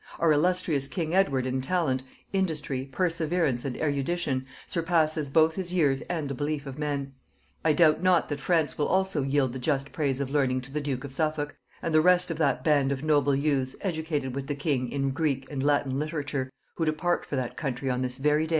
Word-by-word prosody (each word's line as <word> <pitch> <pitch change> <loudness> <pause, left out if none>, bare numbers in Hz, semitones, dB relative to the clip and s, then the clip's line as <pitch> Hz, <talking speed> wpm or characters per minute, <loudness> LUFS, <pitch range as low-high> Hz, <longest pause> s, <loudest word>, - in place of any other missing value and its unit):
Our 165 -1 +3
illustrious 160 -3 +2
king 160 +3 -3
Edward 140 -9 +2
in 130 0 -1
talent, 135 -3 0 0.3
industry, 150 -8 -1
perseverance, 165 -5 0
and 130 -3 -3
erudition, 145 -2 -1 0.2
surpasses 160 -3 +1
both 160 +3 +4
his 185 -1 -3
own 185 - -1
years 140 -5 +3
and 165 -5 -2
the 140 - -3
belief 145 +2 -2
of 135 +1 -7
men.... 140 -2 -2 0.5
I 155 - +4
doubt 155 0 +4
not 185 -2 +3
that 145 -1 -3
France 160 +1 +1
will 145 - +2
also 190 -5 +1
yield 135 -2 +1
the 130 - -5
just 140 0 -1
praise 140 -4 -1
of 140 -1 -3
learning 130 -3 +1
to 130 +2 -9
the 150 +1 -2
duke 135 -2 -3
of 140 -2 -7
Suffolk 155 0 -1 0.3
and 165 - -1
the 155 - +6
rest 180 +1 +4
of 165 - -4
that 135 -5 +1
band 145 -3 +3
of 135 0 -3
noble 145 -3 +3
youths 135 -2 0
educated 160 -7 -2
with 135 0 -4
the 145 - -2
king 140 -4 -1
in 135 -1 0
Greek 135 -2 -1
and 140 -2 -3
Latin 140 -1 +1
literature, 145 -3 -3 0.3
who 165 - +1
depart 175 +3 0
for - - -5
that 130 -3 -2
country 135 -2 -3
on 125 -1 0
this 125 0 -2
very 150 +3 +2
day. - - -11
145 Hz, 210 wpm, -27 LUFS, 135-160 Hz, 0.5 s, the